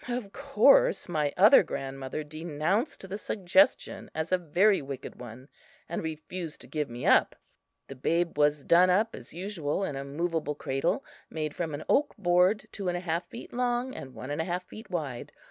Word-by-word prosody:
Of 240 -5 -4
course 485 - +4
my 155 -4 0
other 210 +9 +8
grandmother 135 -3 -5
denounced 160 - -2
the 195 +3 -5
suggestion 210 +8 +1
as 160 +2 -3
a 185 - +4
very 185 +5 +3
wicked 135 -1 -8
one, 125 +2 -10 0.4
and 170 - -3
refused 160 +1 -6
to - - -12
give 150 -2 -3
me 120 +1 -6
up. - - +4 0.5
The - - -7
babe 165 +6 0
was 145 -1 +2
done 180 +2 +6
up 215 +5 +2
as 120 - -11
usual 180 -2 -3
in 150 - -3
a 135 - -4
movable 150 +1 -2
cradle 135 +2 -1 0.2
made 155 -2 -4
from 160 -4 -3
an 150 - -7
oak 290 -2 +2
board 180 +2 +3
two 200 -3 -5
and 175 0 0
a - - -5
half 170 0 -2
feet 235 - -10
long 245 +1 -1
and 130 -1 -9
one 130 - -7
and 150 - -1
a - - -3
half 180 0 -3
feet 220 - -12
wide. 145 -9 -4
170 Hz, 185 wpm, -28 LUFS, 145-195 Hz, 0.5 s, other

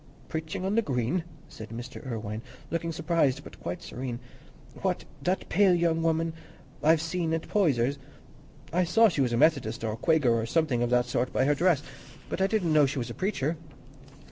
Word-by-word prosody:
"Preaching 160 +3 -4
on 195 - 0
the 230 - +4
Green!" 135 - -1 0.2
said 110 -1 -10
Mr. 120 +2 -8
Irwine, 110 -4 -4 0.3
looking 165 0 -1
surprised 160 -4 +1
but - - -12
quite - - -5
serene. 125 -2 -5 0.6
"What, 185 -2 -1 0.2
that 180 +6 -1
pale 200 -3 +4
pretty 175 - +2
young 165 -1 +2
woman 165 0 +1 0.5
I've 160 +1 +4
seen 165 -1 -1
at 165 - -5
Poyser's? 140 - +2 0.7
I 180 +2 +3
saw 225 +6 +5
she 155 -6 -1
was 125 -3 +2
a 120 - +1
Methodist, 125 -5 +2
or 110 -1 -1
Quaker, 150 0 +3
or 115 0 +1
something 150 -3 +1
of 120 - +1
that 125 0 +3
sort, 125 0 -1
by 130 - +2
her 145 - +4
dress, 160 -1 +2 0.5
but - - -3
I 190 - +4
didn't 195 -7 +1
know 150 -2 +6
she 135 - -4
was 120 -2 -3
a - - -5
preacher." 165 - -1
155 Hz, 195 wpm, -28 LUFS, 125-170 Hz, 0.7 s, know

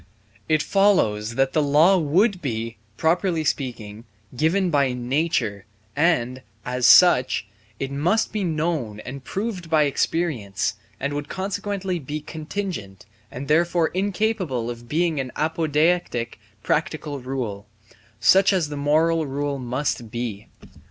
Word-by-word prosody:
It 155 -1 +3
follows 115 - +2
that 135 +1 +1
the 155 - +3
law 150 +6 +5
would 180 +5 +2
be, 115 -5 -3 0.2
properly 170 0 +1
speaking, 115 -7 -3 0.3
given 175 +7 +1
by 140 -4 +2
nature, 125 - -1 0.3
and, 130 -5 +1 0.2
as 125 0 +1
such, 130 - +6 0.3
it 135 0 -3
must 175 +13 +1
be 210 -2 -1
known 155 - -2
and 135 +3 -8
proved 195 - -4
by 155 -2 +4
experience 130 - -1 0.3
and 140 +2 -2
would 145 0 -4
consequently 195 -1 -3
be 150 +1 -5
contingent 155 - -6 0.2
and 130 +3 -7
therefore 170 +1 +2
incapable 185 - -1
of 120 0 -10
being 160 0 +1
an 130 -2 -3
apodeictic 155 -5 0 0.2
practical 150 -2 -1
rule, 125 -6 -4 0.5
such 190 - +5
as 180 -6 0
the 145 - -5
moral 155 +2 +2
rule 140 0 -2
must 125 -2 -2
be. 115 -3 -5
150 Hz, 125 wpm, -23 LUFS, 125-175 Hz, 0.5 s, such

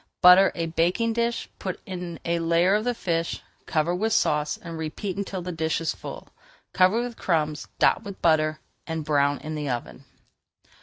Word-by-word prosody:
Butter 180 +2 +8
a 170 - -1
baking 175 +8 +1
dish, 235 0 -1
put 185 -2 -4
in 180 -3 -6
a 170 0 0
layer 170 +3 +3
of 215 +2 +1
the 245 -1 0
fish, 165 -5 -2 0.2
cover 160 +2 +1
with 215 +5 0
sauce, 150 0 +1
and 165 -2 -8
repeat 160 +5 -4
until 195 -2 -4
the 180 - -4
dish 160 -1 -1
is 165 -1 -1
full. - - -9 0.4
Cover 190 +6 +4
with 245 -2 -6
crumbs, 155 -4 -1
dot - - +4
with 200 -3 -9
butter, 155 -2 +2 0.3
and 160 -2 -3
brown 145 -2 +2
in 155 - -5
the 150 -2 -3
oven. 125 +2 -5
170 Hz, 175 wpm, -25 LUFS, 155-190 Hz, 0.4 s, Butter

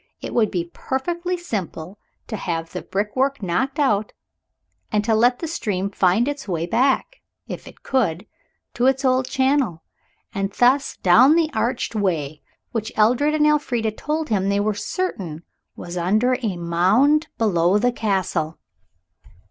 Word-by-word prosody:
It - - -6
would 220 -3 +3
be 170 -2 -3
perfectly 345 +7 -2
simple 200 - -5 0.3
to 220 - -5
have 165 -4 -3
the 180 - -5
brickwork 255 +6 -1
knocked 190 +11 -1
out, 215 -8 +1 0.8
and 210 -1 +1
to 225 - +2
let 240 +3 +4
the 330 - -5
stream 200 - -2
find 195 +5 +2
its 290 -5 -4
way 170 -3 -1
back, 265 - +1 0.3
if - - -7
it - - -15
could, 210 -8 0 0.5
to 245 +2 +1
its 265 0 +1
old 255 0 +2
channel, 260 - +1 0.5
and 195 0 -2
thence 265 +5 +2
down 250 - +6
the 325 -2 +2
arched 235 +2 -1
way 160 -8 -1 0.3
which 220 -2 -3
Edred 250 +8 +3
and 300 -1 +3
Elfrida 250 -7 +1
told 305 +7 -3
him 195 -3 +1
they 200 0 +1
were 210 +1 +1
certain 195 - -4 0.3
was 175 +1 -7
under 215 +9 +2
a 205 -7 -2
mound 195 - +3
below 190 -4 +2
the 245 +4 +2
Castle. 185 -8 -1
220 Hz, 150 wpm, -22 LUFS, 185-265 Hz, 0.8 s, down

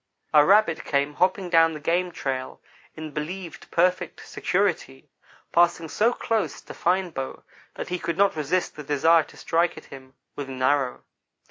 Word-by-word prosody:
A 150 -1 +8
rabbit 195 -1 +4
came 140 +1 0
hopping 185 +3 +1
down 165 -1 +5
the - - -6
game 175 +4 0
trail 130 -5 -4 0.4
in 155 -1 -7
believed 170 +4 -6
perfect 180 +1 0
security, 175 -9 -1 0.4
passing 170 -1 +2
so 225 +8 +2
close 225 -3 -2
to - - -11
Fine 180 0 0
Bow 135 -3 -6 0.3
that - - -6
he 180 0 -2
could 170 -1 -3
not 200 -2 +3
resist 160 +4 -1
the 150 - -7
desire 155 +4 +4
to - - -17
strike 170 +1 0
at - - -10
him 130 0 -13 0.2
with 140 -2 -6
an 130 -1 -5
arrow. 135 -1 +1
165 Hz, 165 wpm, -25 LUFS, 145-180 Hz, 0.4 s, A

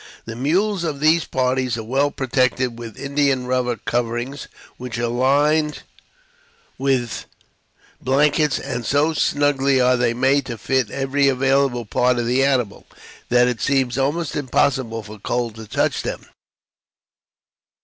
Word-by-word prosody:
The 115 - -7
mules 180 - 0
of 150 -4 -3
these 155 +2 +3
parties 130 -2 0
are 110 - -5
well 135 +6 +1
protected 130 -3 0
with 115 -3 -9
india 140 -1 +1
rubber 125 -1 -1
coverings 120 +4 -3 0.3
which 125 -1 -6
are 120 - -1
lined 145 +5 +1 1.0
with 130 -4 -1 0.8
blankets, 145 +3 +2
and, 125 -3 -4
so 145 +7 +1
snugly 140 -3 +2
are 125 0 +4
they 120 -1 +1
made 135 +2 +2
to 120 -3 -5
fit 130 +2 0
every 140 +2 0
available 135 -2 +1
part 125 +4 +1
of 120 - -1
the 125 +3 +2
animal, 125 -7 0 0.4
that 125 0 +4
it 125 -2 -2
seems 135 -3 +1
almost 145 +4 -1
impossible 130 -4 0
for 105 0 -11
cold 120 +2 -2
to 110 -1 -9
touch - - 0
them. - - -5
130 Hz, 140 wpm, -21 LUFS, 120-140 Hz, 1.0 s, are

